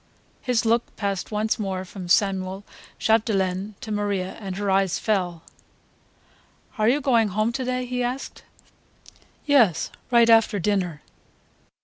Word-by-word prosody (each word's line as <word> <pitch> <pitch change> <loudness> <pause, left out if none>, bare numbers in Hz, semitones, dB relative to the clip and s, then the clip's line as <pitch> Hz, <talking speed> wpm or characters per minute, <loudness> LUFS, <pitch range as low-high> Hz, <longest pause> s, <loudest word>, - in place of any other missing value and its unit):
His 245 -2 0
look 230 +1 +1
passed 200 -3 -3
once 215 +1 -1
more 190 -2 -3
from 185 -1 -8
Samuel 190 0 +1 0.3
Chapdelaine 205 -3 0
to 225 -5 -6
Maria, 205 -3 -1
and 195 -4 -5
her 200 -1 -1
eyes 190 -2 +2
fell. 180 -6 -1 1.4
"Are 215 +1 +4
you 275 +4 +3
going 235 -5 +3
home 215 +3 0
to 260 +2 -3
day?" 255 0 -2
he 250 0 -3
asked. 250 +2 -4 1.0
"Yes; 250 - +3 0.2
right 235 -1 +5
after 225 -2 +5
dinner." 180 -5 -1
210 Hz, 130 wpm, -24 LUFS, 190-230 Hz, 1.4 s, right